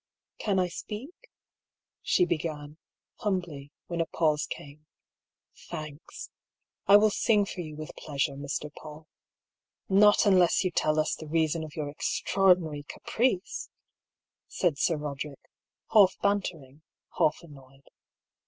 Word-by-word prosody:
"Can 200 -3 0
I 185 -1 +2
speak?" 215 - -8 0.7
she 360 - +3
began, 150 - -4 0.4
humbly, 175 -9 -3
when 170 -1 -2
a 165 - -1
pause 155 -2 +1
came. 150 +2 -9 0.8
"Thanks! 155 -2 -8 0.6
I 200 +1 +9
will 215 0 +4
sing 210 -1 +2
for 185 - -6
you 155 -3 -8
with 155 0 -8
pleasure, 140 -1 -2
Mr. 145 +2 -5
Paull." 155 0 -11 0.5
" - - -55
Not 210 +1 +6
unless 185 -3 +4
you 185 - 0
tell 155 -2 +1
us 155 - +1
the 155 - -7
reason 160 +1 0
of 155 -1 -9
your 145 -2 -4
extraordi 185 +3 +2
nary 150 -3 -5
caprice," 225 -6 -1 0.8
said 165 -6 0
Sir 165 - +2
Boderick, 145 -1 -6 0.4
half 205 -4 +6
bantering, 165 -9 -2 0.4
half 155 +3 +2
annoyed. 135 -3 -16
160 Hz, 130 wpm, -28 LUFS, 150-185 Hz, 0.8 s, I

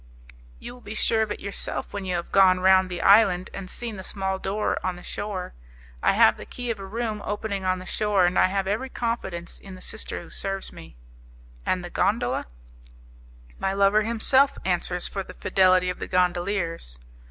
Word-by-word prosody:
"You - - -9
will 250 - -15
be 215 -1 -8
sure 220 +1 +2
of 215 -1 -1
it - - -4
yourself 200 0 -3
when 200 -1 -4
you 180 -1 -1
have 170 0 -4
gone 185 -2 +5
round 185 0 +4
the 175 -2 -4
island 195 -3 +5
and 190 -2 -7
seen 230 -1 -5
the 190 - -7
small 190 0 -3
door 205 +3 -1
on 185 -1 -1
the 180 - -12
shore. 200 -3 -5 0.5
I - - +3
have - - +5
the - - -9
key 245 -1 -4
of 220 - -5
a 195 - -7
room 220 0 -3
opening 205 -2 -3
on 185 0 +1
the 185 - -9
shore, 205 -3 +1
and 175 +1 +2
I - - +5
have 195 0 -1
every 215 +7 -2
confidence 210 -9 -4
in 195 -1 -11
the - - -12
sister 220 - -5
who - - -15
serves 195 0 -3
me." 80 -6 -13 0.7
"And 180 -1 0
the 175 - -8
gondola?" 130 - 0 1.1
"My 195 - -1
lover 200 +2 +4
himself 235 +5 +5
answers 180 -1 0
for 195 - -4
the - - -10
fidelity 185 -1 +3
of - - -9
the - - -5
gondoliers." 175 - -1
195 Hz, 200 wpm, -25 LUFS, 185-210 Hz, 1.1 s, gone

